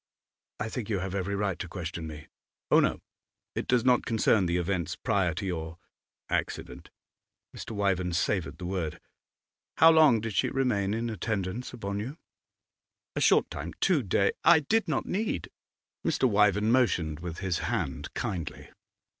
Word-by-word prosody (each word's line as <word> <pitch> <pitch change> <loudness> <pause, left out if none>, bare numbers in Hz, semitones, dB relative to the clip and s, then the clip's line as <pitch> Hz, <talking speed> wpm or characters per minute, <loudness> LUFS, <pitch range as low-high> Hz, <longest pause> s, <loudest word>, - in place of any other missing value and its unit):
'I 105 - -2
think 115 -2 -5
you 105 - +1
have 95 0 -4
every 100 +1 -1
right 100 -3 -1
to 90 - -4
question 85 -2 -5
me.' 75 -1 -9 0.5
'Oh - - +7
no! - - +1 0.5
It - - -3
does 125 -1 +2
not 125 -1 +4
concern 110 -4 +2
the 85 +1 +1
events 90 -2 -1
prior 90 -5 0
to 100 - -4
your 80 -3 -4 0.5
accident.' - - -3 0.7
Mr. 110 - -7
Wyvern 95 -3 +1
savoured 85 +1 0
the 90 - -7
word. 90 -4 -3 0.8
'How 165 0 +8
long 155 -8 +6
did 110 0 -4
she - - +2
remain 110 -7 0
in 115 +1 -2
attendance 110 +1 -3
upon 100 -4 -4
you?' 130 +9 -5 1.0
'A - - -1
short - - +4
time - - -6
two 175 -7 +3
day 100 -2 +2
I 165 -1 +7
did 220 +9 +1
not - - -1
need 195 - -2 0.3
' - - -64
Mr. 130 - +2
Wyvern 105 0 +3
motioned 90 - +2
with 85 -1 -6
his 95 -3 -1
hand, 70 +2 -3
kindly. 85 - -4
100 Hz, 165 wpm, -28 LUFS, 90-115 Hz, 1.0 s, How